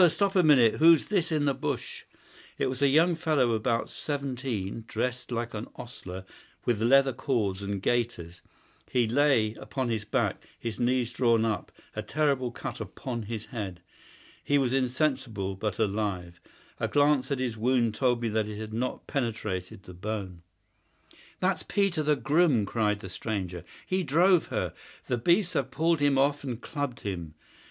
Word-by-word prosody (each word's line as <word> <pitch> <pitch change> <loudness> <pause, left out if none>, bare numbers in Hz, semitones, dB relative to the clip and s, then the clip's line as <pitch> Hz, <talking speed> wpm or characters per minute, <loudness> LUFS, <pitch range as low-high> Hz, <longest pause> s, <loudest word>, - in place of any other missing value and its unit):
Stop 200 +4 0
a 185 - +6
minute! 135 -9 +5
Who's 165 -1 +6
this 180 -5 0
in 150 -2 +1
the 140 - +3
bush?" - - -4 0.5
It - - 0
was 130 +1 -3
a 140 - +5
young 160 +6 +4
fellow 145 -7 +2
about 115 +1 0
seventeen, 130 -8 -4
dressed 125 0 -3
like 120 0 -2
an 105 +1 -5
ostler, 95 -7 -8 0.4
with 115 -3 +1
leather 135 +3 +5
cords 105 -7 -1
and 100 0 -3
gaiters. 110 -8 -1 0.5
He 120 -3 +2
lay 120 -4 +3
upon 130 +2 -4
his 110 -3 -1
back, 105 - -1 0.2
his 115 -2 -5
knees 125 -1 +1
drawn 115 -2 +3
up, 110 -2 -2 0.2
a 105 - -2
terrible 135 +2 0
cut 120 - -6
upon 120 -3 -5
his 110 0 -5
head. 100 -7 -5 0.6
He 145 - +2
was 130 -3 +1
insensible, 130 -6 0
but 95 0 -3
alive. 100 -5 -2 0.4
A - - 0
glance 145 -2 +3
at 140 - +1
his 125 -3 -2
wound 115 0 +2
told 120 0 +1
me 115 - +1
that 110 0 0
it 105 -1 -6
had 110 0 -6
not 125 +3 -2
penetrated 110 -6 -3
the 90 - -11
bone. 95 -2 -5 1.0
"That's 185 -2 +1
Peter, 195 -6 +1
the 150 0 +3
groom," 145 -3 +3
cried 105 -1 0
the - - -7
stranger. 95 -3 -4 0.2
"He 185 0 0
drove 175 +3 +4
her. - - -2 0.3
The 125 - 0
beasts 175 - +3
have 135 -1 0
pulled 165 +3 +1
him 145 -1 +3
off 140 +2 +2
and 125 -4 -4
clubbed 145 -3 -4
him. 85 -6 -5
120 Hz, 165 wpm, -28 LUFS, 110-140 Hz, 1.0 s, a